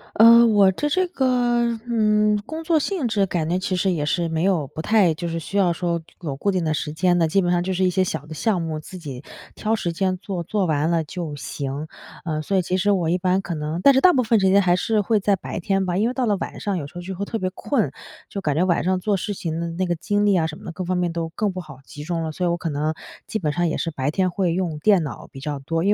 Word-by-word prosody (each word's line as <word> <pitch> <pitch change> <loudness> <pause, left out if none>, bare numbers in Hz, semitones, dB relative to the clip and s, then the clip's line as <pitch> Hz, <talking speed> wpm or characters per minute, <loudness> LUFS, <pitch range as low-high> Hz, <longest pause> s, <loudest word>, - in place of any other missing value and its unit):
呃， 235 +2 +8
我 205 -4 +5
的 295 +9 -1
这 370 +4 +1
个， 240 -6 +1
嗯， 210 -2 +3
工 320 +1 -5
作 325 -1 +3
性 310 -4 -1
质 205 -3 +1
感 165 -3 -2
觉 180 - +1
其 185 0 -2
实 190 0 +1
也 150 -4 -1
是 170 +2 0
没 160 +1 -1
有 175 -8 +1
不 155 +3 -7
太 195 -4 +3
就 170 +1 -4
是 165 0 -3
需 195 +5 -8
要 180 -3 +4
说 170 -1 -1 0.2
有 150 -6 -4
固 200 +8 0
定 180 -3 -1
的 155 - +1
时 150 0 -3
间 175 +2 +2
的， 165 -2 +2
基 195 - +3
本 175 -2 +1
上 175 0 +2
就 190 0 -2
是 185 +1 +1
一 - - +3
些 185 +1 +2
小 150 -5 -4
的 155 - -9
项 180 +3 0
目， 160 -2 -3
自 185 +4 -9
己 140 -6 -8 0.3
挑 220 +1 -1
时 175 -6 -1
间 185 +1 0
做， 185 -2 -4
做 200 +2 0
完 155 0 +1
了 165 -1 +2
就 165 -1 -5
行。 140 +2 -5 0.4
呃， 155 -2 -2
所 195 +5 0
以 - - +4
其 180 +1 -2
实 205 +2 +2
我 175 -5 +1
一 180 - +2
般 185 +1 +1
可 175 -4 -4
能 155 +3 -3
但 275 - +7
是 265 - +3
大 365 - +7
部 260 - +2
分 225 -1 +3
时 190 - +4
间 200 +1 +5
还 175 -1 +3
是 215 +3 +1
会 210 0 +1
在 200 -1 +2
白 175 - -6
天 195 +1 0
吧， 175 -1 -1
因 220 +5 +2
为 - - -3
到 255 -2 0
了 210 -2 +2
晚 - - -5
上， 200 -3 -2
有 145 - -4
时 165 - -19
候 175 - -5
就 190 +1 -6
会 200 - -4
特 225 - -3
别 185 - -1
困。 225 - 0 0.4
就 200 - -5
感 150 -5 0
觉 180 +3 +2
晚 175 -2 +1
上 185 +1 +1
做 205 +2 0
事 205 +2 -3
情 165 -3 -4
的 170 - -2
那 180 +3 -2
个 175 -1 0
精 205 +5 0
力 200 - +4
呀， 165 -3 +2
什 155 -1 -5
么 - - -14
的 170 - -5
各 185 - -4
方 180 +1 -1
面 175 -2 0
都 165 -1 -3
更 200 +3 -2
不 185 - -5
好 140 -5 -12
集 150 -3 -9
中 165 0 -2
了， 160 -1 -3
所 180 - -2
以 - - +2
我 170 - 0
可 165 - -3
能 150 +2 -1 0.3
基 220 - -2
本 150 -4 -1
上 175 -1 +1
也 - - -2
是 165 - -2
白 140 0 -2
天 185 +2 +1
会 180 -1 0
用 170 -3 -1
电 190 -1 +4
脑 145 - -7
比 135 - -10
较 145 0 -4
多。 165 +4 -2
因 205 - +4
180 Hz, 320 characters per minute, -22 LUFS, 165-205 Hz, 0.4 s, 呃